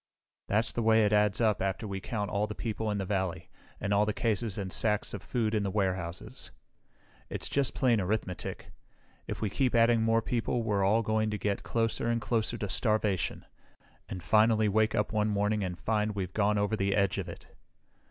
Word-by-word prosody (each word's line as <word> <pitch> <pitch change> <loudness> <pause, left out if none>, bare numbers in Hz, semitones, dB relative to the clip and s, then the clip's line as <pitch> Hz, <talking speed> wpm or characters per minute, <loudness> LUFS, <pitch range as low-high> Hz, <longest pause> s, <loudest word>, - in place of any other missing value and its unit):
That's 110 +2 +1
the 120 - -1
way 110 -1 +4
it 105 - +1
adds 105 -1 +3
up 110 -3 +2
after 95 +3 -2
we 100 -1 -4
count 105 -1 -3
all 105 +1 0
the 105 - -6
people 110 -1 -3
in 105 - -1
the 95 - -2
valley, 95 -3 -2 0.3
and 100 - -1
all 105 +1 +3
the 105 - 0
cases 110 -2 -1
and 95 -2 -3
sacks 105 -2 +1
of 100 - -5
food 115 -1 -1
in 110 - +2
the 100 - -1
warehouses. 95 +3 -3 0.8
"It's - - -4
just 140 -2 0
plain 120 -5 +3
arithmetic. 90 -2 -3 0.6
If - - -5
we 105 - -1
keep 130 0 +1
adding 115 0 +4
more 115 0 +2
people 120 0 -1
we're 105 -3 +1
all 110 +4 +3
going 110 0 +1
to 105 - -2
get 100 +1 -1
closer 115 0 -1
and 115 0 +1
closer 115 0 -1
to 105 - -3
starvation, 105 - 0 0.6
and 90 -3 -6
finally 110 +4 +4
wake 110 +2 +2
up 105 - 0
one 105 0 +1
morning 105 0 0
and 90 -2 -3
find 105 +2 -1
we've 95 -2 -3
gone 105 0 +2
over 105 +2 +1
the 100 -1 0
edge 100 -2 +1
of - - -4
it. - - -12
105 Hz, 200 wpm, -30 LUFS, 100-110 Hz, 0.8 s, way